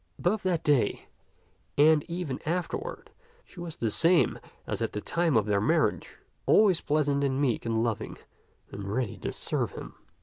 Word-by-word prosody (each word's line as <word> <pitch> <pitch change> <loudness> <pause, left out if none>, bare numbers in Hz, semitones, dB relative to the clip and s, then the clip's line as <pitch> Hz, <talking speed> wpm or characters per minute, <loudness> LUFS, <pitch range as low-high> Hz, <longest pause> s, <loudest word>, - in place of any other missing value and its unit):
Both 195 +4 0
that 180 -3 0
day 140 -8 +1 0.7
and 150 +1 +5
ever 170 -6 -3
afterward 180 - -3 0.3
she 185 - -14
was 170 -2 -6
the 115 -2 -1
same 170 - +3 0.3
as - - -3
at - - -2
the 105 - -2
time 165 +3 +1
of 105 - +2
their 100 -2 +1
marriage, - - 0 0.3
always 200 -5 +5
pleasant 145 -1 +1
and 135 -1 0
meek 125 -5 0
and 115 0 +1
loving 115 -3 -3 0.5
and 100 - -7
ready 120 -2 -2
to - - -3
serve - - -2
him. - - -8
145 Hz, 165 wpm, -28 LUFS, 115-175 Hz, 0.7 s, and